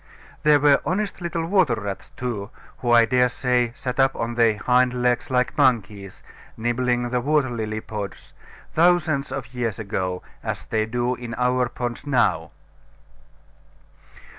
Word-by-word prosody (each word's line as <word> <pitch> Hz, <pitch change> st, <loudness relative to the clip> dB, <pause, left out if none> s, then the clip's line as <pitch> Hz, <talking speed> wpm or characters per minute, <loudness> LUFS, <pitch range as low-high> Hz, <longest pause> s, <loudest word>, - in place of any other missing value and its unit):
There 150 Hz, -1 st, +5 dB
were 145 Hz, -1 st, +4 dB
honest 195 Hz, +5 st, -2 dB
little 170 Hz, -1 st, -2 dB
water 175 Hz, -, +3 dB
rats 100 Hz, -2 st, -6 dB
too, 115 Hz, -5 st, -4 dB, 0.3 s
who 120 Hz, -, -3 dB
I 120 Hz, -1 st, +6 dB
dare 125 Hz, +2 st, +3 dB
say 125 Hz, -1 st, 0 dB
sat 125 Hz, 0 st, -5 dB
up 135 Hz, 0 st, +3 dB
on 115 Hz, +1 st, -3 dB
their 115 Hz, -2 st, +3 dB
hind 125 Hz, +2 st, +2 dB
legs 125 Hz, -1 st, 0 dB
like 125 Hz, -1 st, +1 dB
monkeys, 105 Hz, -6 st, 0 dB, 0.3 s
nibbling 120 Hz, +1 st, 0 dB
the 125 Hz, 0 st, 0 dB
water 145 Hz, -1 st, +1 dB
lily 110 Hz, -2 st, -3 dB
pods, 105 Hz, -3 st, -7 dB, 0.4 s
thousands 160 Hz, -4 st, +2 dB
of 130 Hz, -2 st, -6 dB
years 120 Hz, -4 st, -2 dB
ago, 95 Hz, -4 st, -3 dB, 0.2 s
as -, -, -4 dB
they 110 Hz, -1 st, -1 dB
do 120 Hz, +2 st, -1 dB
in 120 Hz, -2 st, -6 dB
our 125 Hz, 0 st, +1 dB
ponds 120 Hz, +3 st, -5 dB
now. 120 Hz, -, +1 dB
125 Hz, 145 wpm, -23 LUFS, 115-135 Hz, 0.4 s, I